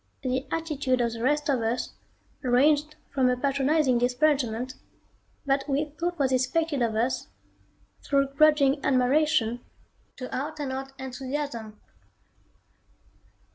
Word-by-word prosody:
The 260 +1 -1
attitude 290 -6 -1
of 235 -1 0
the 230 - -6
rest 295 +4 +1
of 265 -5 +1
us 230 +2 -1 0.5
ranged 290 +4 +3 0.2
from 260 -2 +3
a 250 - +1
patronizing 275 0 +2
disparagement 250 -1 +1 0.7
that 275 +1 0
we 290 +2 -1
thought 345 +1 -1
was 270 -3 +1
expected 275 +3 +1
of 230 -2 +1
us, 235 - 0 0.8
through 275 -1 +2
grudging 285 -1 +4
admiration, 255 -2 +2 0.5
to 255 - -6
out 300 +4 -4
and 280 -3 -3
out 270 +1 -5
enthusiasm. 260 -4 -5
270 Hz, 120 wpm, -27 LUFS, 250-295 Hz, 0.8 s, grudging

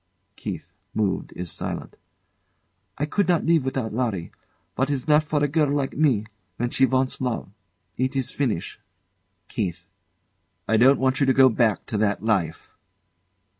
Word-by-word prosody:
[KEITH, 90 -5 -7 0.2
moved, 105 -4 -1
is 90 -2 -5
silent.] - - -5 1.0
I 145 - 0
could 190 +5 0
not 175 -2 +2
live 165 -3 +4
without 130 -4 -2
Larry. 110 -8 -2 0.4
What 135 +7 0
is 140 -1 -2
left 150 0 +4
for 150 -1 +1
a - - +3
girl 150 0 +2
like 140 -1 -1
me 130 -8 +2 0.3
when 120 0 -1
she 130 - +4
once 130 0 0
love? 125 -6 -2 0.5
It 130 +2 0
is 135 -2 -1
finish. 115 -12 -2 0.7
KEITH. 90 -6 -3 0.8
I 110 - +3
don't 130 +5 +6
want 130 0 +1
you 140 - +3
to 130 - +5
go 130 0 +7
back 115 -2 +1
to 105 - -2
that 105 -1 +1
life. 95 -8 -1
130 Hz, 160 wpm, -24 LUFS, 110-140 Hz, 1.0 s, go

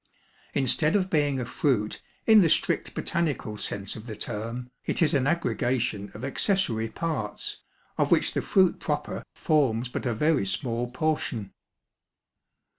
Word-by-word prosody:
Instead 145 - +3
of 190 -2 +1
being 145 -4 +2
a 125 - -2
fruit 115 -5 0 0.2
in 220 -2 +8
the 170 - +4
strict - - +1
botanical 145 -10 -1
sense 100 -1 -4
of 110 +2 -9
the 110 - -5
term, 115 +4 -5
it - - -1
is 165 -1 +3
an 135 -2 +2
aggregation 125 -10 0
of 110 - -5
accessory 135 - +1
parts, 150 -6 -3 0.4
of - - +3
which - - +3
the - - 0
fruit 185 -3 +3
proper - - -3
forms 130 -6 +1
but 125 - -3
a 120 - +1
very 150 +1 +2
small 120 +4 -1
portion. 125 -7 -2
130 Hz, 145 wpm, -27 LUFS, 110-155 Hz, 0.4 s, in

